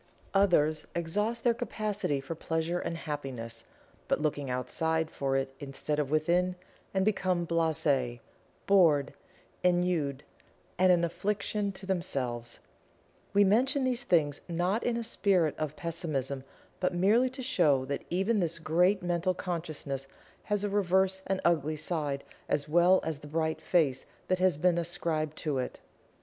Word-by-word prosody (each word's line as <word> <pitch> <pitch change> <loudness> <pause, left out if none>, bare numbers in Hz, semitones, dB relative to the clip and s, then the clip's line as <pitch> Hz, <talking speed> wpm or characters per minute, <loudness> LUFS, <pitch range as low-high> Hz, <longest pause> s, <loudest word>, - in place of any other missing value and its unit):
Others 155 -6 +3
exhaust 210 +8 -1
their 240 - +4
capacity 210 - -2
for 135 +4 -5
pleasure 165 +2 -2
and 170 -1 -3
happiness, 125 -7 -6 0.4
but - - +1
looking 145 -3 -1
outside 160 +5 -1
for 135 -1 -1
it 135 0 -2
instead 145 +1 -3
of 145 -3 0
within, 175 +4 +2 0.4
and 190 -1 +1
become 185 -4 +1
blase, 155 -7 +1 0.5
bored, 165 -8 +4 0.5
ennuied 175 -6 +1 0.6
and 185 0 +6
an 175 -1 +4
affliction 200 +4 -1
to 190 0 -11
themselves 125 -11 -3 0.7
We 205 0 +5
mention 260 +8 +3
these 250 -2 +1
things 155 - +1
not 180 +6 0
in 240 -1 0
a 235 - -2
spirit 190 -8 +2
of 155 -1 -2
Pessimism 140 -6 -3 0.3
but 180 -1 0
merely 215 +8 +4
to 260 +1 -6
show 150 - +3
that 140 +1 -3
even 195 +5 +1
this 170 -3 -1
great 175 +4 +2
Mental 175 +1 0
Consciousness 155 -7 -4 0.4
has 205 -1 0
a 205 - 0
reverse 190 -1 +2
and 190 0 0
ugly 155 -3 +2
side 150 -3 -2 0.3
as 145 0 0
well 175 +4 +5
as 160 -3 -3
the 150 - -11
bright 160 +1 -1
face 140 -7 +1 0.2
that 185 0 +2
has 185 -4 +3
been 175 +2 +3
ascribed 160 -2 -2
to 145 -4 -1
it. 125 - -4
170 Hz, 145 wpm, -30 LUFS, 150-190 Hz, 0.7 s, and